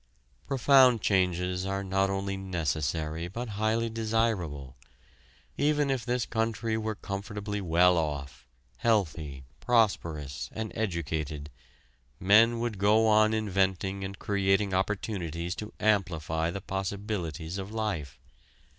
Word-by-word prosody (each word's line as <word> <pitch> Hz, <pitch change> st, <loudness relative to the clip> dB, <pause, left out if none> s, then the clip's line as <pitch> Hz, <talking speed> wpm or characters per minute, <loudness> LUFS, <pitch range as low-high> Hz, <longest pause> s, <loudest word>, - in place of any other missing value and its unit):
Profound 130 Hz, -2 st, +5 dB
changes 90 Hz, -2 st, +1 dB
are 95 Hz, +1 st, -2 dB
not 95 Hz, 0 st, +1 dB
only 95 Hz, 0 st, -2 dB
necessary, 80 Hz, -3 st, -2 dB
but 115 Hz, +6 st, -5 dB
highly 110 Hz, +1 st, +1 dB
desirable. 110 Hz, -, -1 dB, 0.8 s
Even 145 Hz, -1 st, +2 dB
if 130 Hz, -4 st, -1 dB
this 125 Hz, -1 st, 0 dB
country 115 Hz, 0 st, -1 dB
were 110 Hz, -1 st, -2 dB
comfortably 105 Hz, +1 st, -5 dB
well 90 Hz, 0 st, +4 dB
off, 70 Hz, -5 st, -4 dB, 0.3 s
healthy, 80 Hz, -, 0 dB, 0.2 s
prosperous, 85 Hz, -, 0 dB
and 110 Hz, -1 st, -4 dB
educated, 80 Hz, -7 st, -3 dB, 0.7 s
men 110 Hz, +5 st, +5 dB
would 115 Hz, -4 st, -3 dB
go 105 Hz, +3 st, +4 dB
on 110 Hz, 0 st, +5 dB
inventing 95 Hz, -2 st, 0 dB
and 95 Hz, +1 st, -5 dB
creating 100 Hz, 0 st, +1 dB
opportunities 95 Hz, -3 st, -2 dB
to 105 Hz, +2 st, -7 dB
amplify 85 Hz, -6 st, +1 dB
the 95 Hz, +3 st, -5 dB
possibilities 95 Hz, -3 st, -4 dB
of 95 Hz, +2 st, -6 dB
life. 105 Hz, -, -3 dB
95 Hz, 110 wpm, -29 LUFS, 85-110 Hz, 0.8 s, Profound